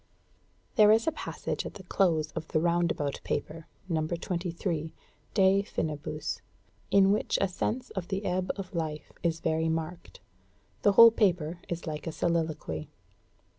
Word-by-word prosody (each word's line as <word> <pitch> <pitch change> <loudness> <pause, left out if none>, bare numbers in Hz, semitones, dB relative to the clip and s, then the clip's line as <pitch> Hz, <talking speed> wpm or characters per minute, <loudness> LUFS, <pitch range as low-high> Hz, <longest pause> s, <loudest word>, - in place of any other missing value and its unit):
There 210 -1 +8
is 225 +1 +4
a - - +2
passage 310 - -4
at - - -7
the 195 - -10
close 170 -4 +1
of 160 -1 -5
the 155 - +1
'Roundabout 170 -4 0
Paper' 160 +1 -3 0.2
No. 160 -3 0
23, 170 -1 -3 0.4
'De 195 -1 +5
Finibus,' 150 -5 -3 0.5
in 195 0 +5
which 210 - +1
a 195 - +2
sense 220 +7 -3
of 190 -3 -4
the 195 +1 -3
ebb 185 +1 -1
of 195 -2 -7
life 155 -3 -3
is 165 -1 0
very 160 0 +1
marked; 165 +2 -4 0.6
the 205 - +4
whole 230 +3 +10
paper 175 -6 +1
is 170 -1 -4
like 155 0 -5
a - - -1
soliloquy. 155 - -2
170 Hz, 150 wpm, -29 LUFS, 160-195 Hz, 0.6 s, whole